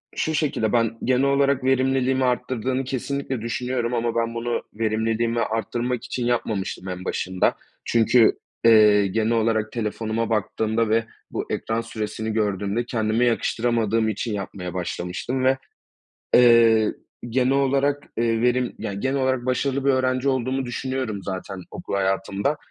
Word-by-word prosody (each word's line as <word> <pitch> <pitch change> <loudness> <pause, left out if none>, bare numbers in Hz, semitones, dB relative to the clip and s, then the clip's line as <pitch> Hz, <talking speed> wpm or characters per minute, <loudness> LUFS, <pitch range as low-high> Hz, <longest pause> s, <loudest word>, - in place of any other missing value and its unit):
Şu 160 - -1
şekilde, 140 -8 0
ben 115 -1 +1
genel 130 +1 +2
olarak 140 -1 +2
verimliliğimi 130 0 +2
arttırdığını 125 +1 -1
kesinlikle 135 -1 -3
düşünüyorum 125 +1 -2
ama 115 -1 -1
ben 115 0 0
bunu 120 0 -2
verimliliğimi 115 +1 0
arttırmak 115 +2 -2
için 125 -1 -3
yapmamıştım 110 -6 -2
en 90 0 -6
başında. 95 0 0 0.3
Çünkü, 115 0 +4 0.3
eee, 105 -3 +6
genel 110 +3 0
olarak 110 -1 +1
telefonuma 115 0 -2
baktığımda 110 +1 0
ve 115 +1 +2 0.3
bu - - -3
ekran 115 +1 -1
süresini 110 -1 -4
gördüğümde 105 +1 -1
kendime 115 0 +1
yakıştıramadığım 115 -2 +1
için 110 +2 -3
yapmaya 95 -3 -5
başlamıştım 90 +8 -3
ve, 130 +1 +3 0.8
eee, 115 -3 +6 0.4
genel 130 +2 +2
olarak, 140 +1 +1
eee, 115 -1 +1
verim 125 0 +1
yani, 100 0 -4
genel 135 +3 0
olarak 130 -1 0
başarılı 135 +1 0
bir 140 - +4
öğrenci 130 0 +1
olduğumu 130 0 0
düşünüyorum 125 -4 -3
zaten 95 0 -5
okul - - -6
hayatımda. 100 +7 0
115 Hz, 135 wpm, -23 LUFS, 110-130 Hz, 0.8 s, eee